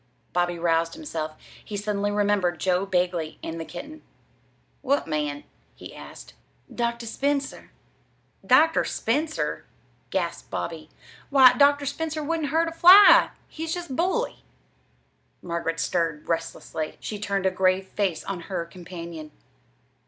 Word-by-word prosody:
Bobby 175 0 0
roused 165 0 +1
himself. 160 - -5 0.3
He 205 - -6
suddenly 205 0 -1
remembered 205 -5 +1
Joe 185 +1 +1
Bagley 175 -4 -1
and 165 0 -5
the 165 - -5
kitten. 310 - -9 0.8
"What 280 +1 +1
man?" 150 -2 -2 0.3
he - - -11
asked. - - -11 0.4
"Dr. 235 0 -2
Spencer." 280 +4 -2 0.7
"Dr. 320 +1 +4
Spencer!" 300 +7 -2 0.5
gasped - - -3
Bobby. - - -5 0.4
"Why, 265 -3 +7
Dr. 285 0 +4
Spencer 315 +2 -3
wouldn't 315 -1 -1
hurt 325 +3 +2
a - - -9
fly. 365 +5 +8 0.2
He's 325 +1 -4
just 345 -7 -6
bully!" 375 - -1 1.0
Margaret 170 -1 -3
stirred 165 -3 -1
restlessly. 165 -1 -3
She 210 - -6
turned 200 -2 -2
a 190 - +3
grave 185 0 +2
face 190 -3 -2
on 195 -3 -4
her 185 -3 -2
companion. 170 -2 -9
200 Hz, 125 wpm, -25 LUFS, -, 1.0 s, fly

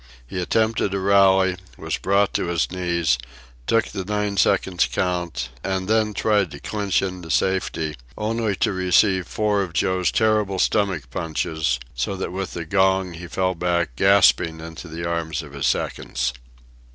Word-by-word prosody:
He 90 +9 -4
attempted 110 0 +1
a - - 0
rally, 95 -1 +4 0.2
was - - -3
brought 100 +1 +2
to - - -1
his 85 -1 0
knees, 85 -7 0 0.5
took 115 0 +3
the 95 -2 -4
nine 105 +1 -1
seconds' 90 -1 +2
count, 85 -9 -2
and 95 -1 -2
then 110 -1 +1
tried 105 -4 +2
to 70 - -9
clinch 100 0 -1
into 90 -3 -5
safety, 80 -1 0 0.2
only 110 -1 -1
to 100 - 0
receive 95 0 +2
four 105 -1 0
of 90 -4 -4
Joe's 90 +2 +1
terrible 105 -3 +1
stomach 90 - 0
punches, 80 -4 -1
so 65 +10 -2
that 95 - -4
with 95 +1 -4
the 85 - -4
gong 95 0 +2
he 85 +1 -8
fell 95 +2 0
back, 85 -6 -1
gasping, 90 -2 +4
into 80 +1 -9
the 85 +1 -6
arms 80 -2 -2
of 75 -2 -12
his 70 -1 -1
seconds. 60 0 -1
95 Hz, 160 wpm, -22 LUFS, 85-100 Hz, 0.5 s, rally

